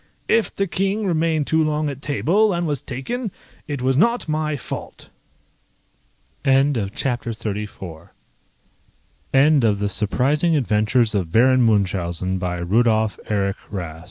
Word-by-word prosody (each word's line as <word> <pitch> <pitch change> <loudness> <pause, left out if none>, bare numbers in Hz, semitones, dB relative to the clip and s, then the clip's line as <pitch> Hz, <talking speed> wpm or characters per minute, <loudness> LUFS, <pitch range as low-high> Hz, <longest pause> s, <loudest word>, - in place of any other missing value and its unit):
If 230 - +1
the 195 - 0
King 195 +4 -1
remained 160 -4 +1
too 160 +2 +2
long 155 0 0
at 140 -1 -5
table, 185 +9 +2
and 175 0 -1
was 145 -4 -1
taken, 205 - -4 0.4
it 145 -4 -4
was 130 0 +2
not 235 - +2
my 155 -1 -1
fault. - - -8 1.3
End 135 +1 +3
of 110 -4 0
the - - -2
Project 125 -2 -1 0.2
Gutenberg 100 -6 -6 1.2
EBook 140 0 +4
of 105 -3 +3
The 100 0 -1
Surprising 140 - +1
Adventures 110 -2 +2
of 90 -6 -1
Baron 130 +5 +4
Munchausen, 95 -4 0
by 90 -1 -2
Rudolph 110 +4 +1
Erich 100 -1 0
130 Hz, 135 wpm, -21 LUFS, 105-155 Hz, 1.3 s, EBook